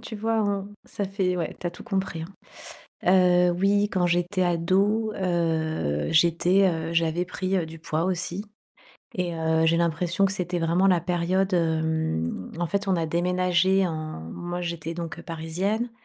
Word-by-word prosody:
tu 225 -2 -7
vois? 225 +1 0
On 200 -1 -1 0.2
ça 200 - -4
fait 190 -2 -1
ouais, 170 - -3
tu - - -3
as - - -1
tout 175 - -12
compris, 190 -7 -2
hein, 185 +4 -9 1.2
heu, - - +2
oui, 200 +3 +2
quand 180 -2 +1
j'étais 175 +2 0
ado, 190 +6 +2
heu, 160 - 0
j'étais, 170 +4 +4
heu, 160 0 -3
j'avais 165 +1 +1
pris, 185 +1 -2
heu, 175 - 0
du 160 +1 -10
poids 160 +1 -2
aussi 185 +2 -2 0.7
et 175 -2 -2
heu, 160 0 +1
j'ai 165 - +3
l'impression 170 +3 +1
que 190 - 0
c'était 180 -2 -2
vraiment 170 +3 +2
la 180 -3 +4
période. 180 +2 0
Hem, 160 - -1
en 175 - 0
fait, 200 +4 -2
on 190 - +3
a 165 -2 0
déménagé 180 +3 +2
en 155 - -4
moi, 175 0 -5
j'étais 170 -1 -4
donc, 170 -2 -5
heu, - - -10
parisienne, 185 +8 -2
175 Hz, 170 wpm, -25 LUFS, 165-190 Hz, 1.2 s, j'étais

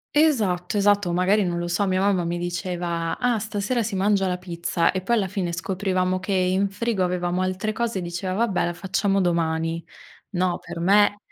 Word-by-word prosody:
Esatto, 210 - +2
esatto. 205 -2 +3
O - - -1
magari, 195 +4 +3
non 175 -1 -1
lo 175 0 -2
so, 195 +3 0
mia 185 0 +1
mamma 195 -3 +2
mi 170 +1 -2
diceva: 175 -1 -3
"Ah, 245 -3 +1
stasera 215 +3 -1
si 210 -2 -3
mangia 195 0 +2
la 180 0 -1
pizza" 170 -1 0
e 185 - -3
poi 235 +6 +1
alla 200 -4 +1
fine 185 -3 -2
scoprivamo 185 0 -1
che 195 +1 -3
in 190 +1 +2
frigo 205 -1 -1
avevamo 180 0 -1
altre 185 +4 -1
cose 230 -2 -2
e - - -2
diceva: 175 +2 -3
"Vabbè, 220 -5 +1
la 175 - -2
facciamo 195 +2 0
domani." 165 -1 0 0.5
No, 180 -1 +1
per 170 - -7
me 205 +3 +4
185 Hz, 195 wpm, -24 LUFS, 175-205 Hz, 0.5 s, me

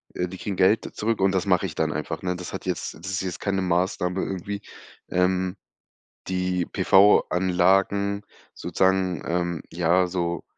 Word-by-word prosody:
Äh, 90 0 -1
die 95 - -9
kriegen 100 -1 -4
Geld 95 +4 +2
zurück 110 -1 -1
und 95 0 +3
das 95 0 0
mache 90 0 +2
ich 80 - -7
dann 80 -1 0
einfach, 75 - -4
ne? 90 -1 -1
Das 90 - -7
hat 95 - -6
jetzt 90 -2 -3
das 85 +4 -8
ist 100 - -1
jetzt 90 -2 -5
keine 95 -1 -1
Maßnahme 90 +1 0
irgendwie, 100 +2 -4 0.5
ähm, 90 +1 +1 0.7
die 90 -1 -1
PV-Anlagen 95 +1 +3 0.3
sozusagen, 95 -2 0
ähm, 85 -1 -1
ja, 90 +2 +2
so 85 -1 -2
90 Hz, 160 wpm, -25 LUFS, 90-95 Hz, 0.7 s, und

